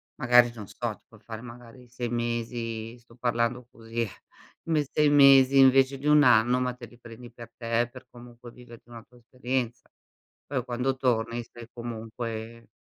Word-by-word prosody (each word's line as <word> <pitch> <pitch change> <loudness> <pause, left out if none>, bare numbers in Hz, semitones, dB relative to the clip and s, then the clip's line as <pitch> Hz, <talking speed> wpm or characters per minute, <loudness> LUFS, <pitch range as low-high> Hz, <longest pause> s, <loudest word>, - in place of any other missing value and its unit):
Magari, 120 -1 +4
non 105 -4 -10
so, - - -4
ti - - -31
puoi - - -19
fare, 110 -1 -9
magari, 120 +1 -13
6 125 0 -5
mesi 115 -1 -4
sto 115 -1 -21
parlando 120 0 -1
così, 115 0 -4 0.6
m 160 -2 +1
6 150 +1 +1
mesi 135 -1 +6
invece 135 +1 +5
di 140 +2 -5
1 150 0 +6
anno, 125 0 +4
ma 125 -1 -1
te 125 -1 -11
li 120 - -19
prendi 120 0 -12
per 120 -1 -12
te, 115 0 -1
per 130 0 -13
comunque 120 0 -14
viverti 120 -1 -15
una 115 -2 -11
tua 125 - -23
esperienza. 120 0 -4 0.6
Poi 130 -3 -3
quando 125 +2 -2
torni, 120 -2 -1
stai 115 0 -13
comunque 115 0 -7
120 Hz, 170 wpm, -26 LUFS, 115-125 Hz, 0.6 s, mesi